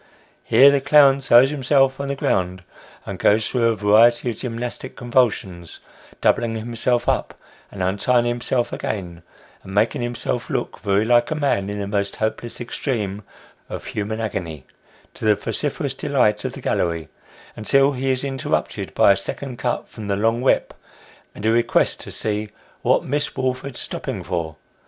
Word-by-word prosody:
Here 140 Hz, +2 st, +6 dB
the 140 Hz, -1 st, +1 dB
clown 140 Hz, 0 st, +5 dB
throws 130 Hz, +1 st, +5 dB
himself 135 Hz, -1 st, +2 dB
on 140 Hz, -, -3 dB
the 140 Hz, -, -2 dB
ground, 90 Hz, -7 st, -1 dB, 0.4 s
and -, -, -6 dB
goes 105 Hz, +1 st, +3 dB
through 120 Hz, -2 st, +1 dB
a 115 Hz, -, +2 dB
variety 115 Hz, +4 st, +4 dB
of 110 Hz, -, -9 dB
gymnastic 120 Hz, -1 st, -5 dB
convulsions, 110 Hz, -9 st, -1 dB, 0.4 s
doubling 115 Hz, -1 st, +2 dB
himself 120 Hz, +2 st, -1 dB
up, -, -, 0 dB, 0.4 s
and 95 Hz, -, -4 dB
untying 120 Hz, +6 st, +2 dB
himself 120 Hz, +1 st, -1 dB
again, 90 Hz, -5 st, -4 dB, 0.4 s
and 95 Hz, -, -9 dB
making 110 Hz, +3 st, +2 dB
himself 120 Hz, 0 st, -3 dB
look -, -, -3 dB
very 100 Hz, +1 st, +1 dB
like 120 Hz, 0 st, +3 dB
a 155 Hz, -, -1 dB
man 135 Hz, -10 st, 0 dB
in 105 Hz, -, -4 dB
the 100 Hz, -, -3 dB
most 100 Hz, 0 st, -2 dB
hopeless 110 Hz, +2 st, -3 dB
extreme 110 Hz, -5 st, -3 dB, 0.5 s
of -, -, -6 dB
human 110 Hz, +1 st, -4 dB
agony, 85 Hz, -10 st, -4 dB, 0.5 s
to -, -, -10 dB
the 105 Hz, -1 st, +4 dB
vociferous -, -, -3 dB
delight -, -, +1 dB
of -, -, -3 dB
the -, -, -9 dB
gallery, 85 Hz, -2 st, -1 dB, 0.5 s
until 135 Hz, +5 st, +3 dB
he 135 Hz, 0 st, -2 dB
is 130 Hz, 0 st, 0 dB
interrupted 135 Hz, -2 st, -3 dB
by -, -, +6 dB
a -, -, +4 dB
second 125 Hz, +6 st, -5 dB
cut 125 Hz, -, -2 dB
from 110 Hz, -2 st, -9 dB
the 100 Hz, -, 0 dB
long 115 Hz, +4 st, +1 dB
whip, 130 Hz, -, +1 dB, 0.6 s
and 105 Hz, -, -7 dB
a 110 Hz, -, +4 dB
request 115 Hz, +1 st, +2 dB
to -, -, -8 dB
see 105 Hz, 0 st, -2 dB, 0.2 s
" -, -, -31 dB
what -, -, +2 dB
Miss 145 Hz, +2 st, -2 dB
Woolford's 130 Hz, 0 st, -3 dB
stopping -, -, -4 dB
for 85 Hz, -3 st, -3 dB
115 Hz, 165 wpm, -21 LUFS, 100-130 Hz, 0.6 s, Here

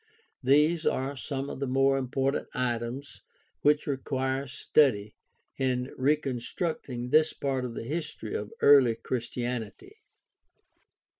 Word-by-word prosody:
These 150 Hz, +5 st, +3 dB
are 135 Hz, +2 st, 0 dB
some 135 Hz, 0 st, -4 dB
of -, -, -6 dB
the 140 Hz, -, -2 dB
more 135 Hz, +1 st, +3 dB
important 135 Hz, +1 st, -1 dB
items 125 Hz, +2 st, -3 dB, 0.4 s
which 150 Hz, +1 st, +3 dB
require 135 Hz, -1 st, -2 dB
study 120 Hz, -5 st, +2 dB, 0.5 s
in 130 Hz, -1 st, -1 dB
reconstructing 135 Hz, -2 st, -1 dB
this 155 Hz, 0 st, +4 dB
part 135 Hz, -2 st, -2 dB
of 120 Hz, -2 st, -6 dB
the -, -, -4 dB
history 150 Hz, -4 st, -4 dB
of 105 Hz, 0 st, -4 dB
early 135 Hz, -5 st, +7 dB
Christianity. 120 Hz, -, -4 dB
135 Hz, 115 wpm, -28 LUFS, 125-145 Hz, 0.5 s, early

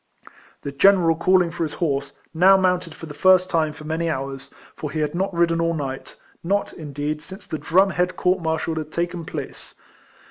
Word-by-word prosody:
The 140 Hz, -, -4 dB
general 165 Hz, +2 st, +4 dB
calling 180 Hz, +1 st, +3 dB
for 170 Hz, -, -7 dB
his 155 Hz, -3 st, -1 dB
horse, 140 Hz, -4 st, -2 dB, 0.2 s
now 185 Hz, +4 st, +6 dB
mounted 180 Hz, -3 st, 0 dB
for -, -, -9 dB
the 150 Hz, -, -9 dB
first 185 Hz, +4 st, +4 dB
time 160 Hz, -2 st, +1 dB
for 155 Hz, -, -12 dB
many 160 Hz, +2 st, -2 dB
hours; 135 Hz, -1 st, -5 dB, 0.2 s
for 150 Hz, -, -5 dB
he 155 Hz, -, -4 dB
had 150 Hz, -1 st, -1 dB
not 190 Hz, +3 st, -1 dB
ridden 170 Hz, -1 st, +1 dB
all 165 Hz, 0 st, 0 dB
night, 135 Hz, -3 st, -5 dB, 0.3 s
not, 200 Hz, +4 st, -1 dB
indeed, 150 Hz, 0 st, -4 dB
since 190 Hz, +4 st, -11 dB
the 155 Hz, -, -5 dB
drum 190 Hz, +3 st, +3 dB
head 180 Hz, +2 st, 0 dB
court 180 Hz, +1 st, +1 dB
martial 160 Hz, 0 st, -1 dB
had 155 Hz, -1 st, -5 dB
taken 170 Hz, 0 st, -3 dB
place. -, -, -7 dB
165 Hz, 190 wpm, -22 LUFS, 150-180 Hz, 0.3 s, now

